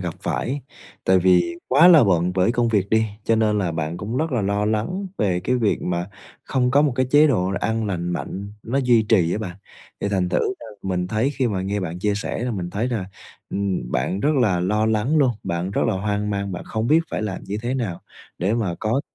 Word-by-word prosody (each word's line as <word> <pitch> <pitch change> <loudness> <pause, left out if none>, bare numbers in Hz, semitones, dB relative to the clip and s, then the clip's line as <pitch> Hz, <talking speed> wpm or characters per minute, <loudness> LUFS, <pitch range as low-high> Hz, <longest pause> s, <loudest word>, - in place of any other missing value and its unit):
gặp 90 -2 -4
phải. 140 +3 -2 0.4
Tại 95 0 +4
vì 90 -2 +3
quá 145 +7 +7
là 160 -7 +8
bận 90 -2 +2
với 95 +4 +2
công 120 -1 +1
việc 100 -3 +1
đi, 110 0 +4 0.2
cho 115 - +2
nên 110 -1 +2
là 90 -4 -1
bạn 80 +1 -3
cũng 110 +6 -4
rất 155 +1 -1
là 120 -5 +1
lo 100 +1 0
lắng 110 - -1
về 90 -4 +1
cái 125 +7 0
việc 110 -4 0
mà 90 0 -2 0.4
không 125 -2 +1
có 140 +3 +4
một 145 -4 +2
cái 130 -1 +2
chế 150 +2 +6
độ 95 -9 +1
ăn 110 0 -1
lành 90 -3 -2
mạnh 100 +3 -5
nó 130 +5 -1
duy 125 -4 +4
trì 95 -6 +2
á - - -1
bạn. 95 -4 -6 0.4
Thì - - -1
thành 95 -3 0
thử 90 - +1 0.2
ra - - -9 0.2
mình 90 -2 -1
thấy 110 +7 +1
khi 130 - +1
mà 95 -5 -1
nghe 100 +2 -2
bạn 90 -1 -4
chia 105 +2 0
sẻ 110 +3 -3
là 125 - -1
mình 90 -5 -4
thấy 110 +5 -1
là, 115 -6 -2 0.5
ừm, 95 -10 -2
bạn 80 +11 -1
rất 150 +1 +2
là 105 -9 +2
lo 105 +4 +1
lắng 110 +7 +1
luôn, 135 -4 +4
bạn 85 +2 -2
rất - - 0
là 110 - +1
hoang 105 +2 -1
mang, 100 -1 -2
bạn 90 - -6
không 110 0 -2
biết 155 +6 +5
phải - - -2
làm 105 -3 -4
như 100 +2 -4
thế 125 +2 -1
nào 110 -10 -3 0.4
để 95 +5 +1
mà 105 -7 -1
có 115 +5 +1
105 Hz, 240 wpm, -22 LUFS, 95-120 Hz, 0.5 s, là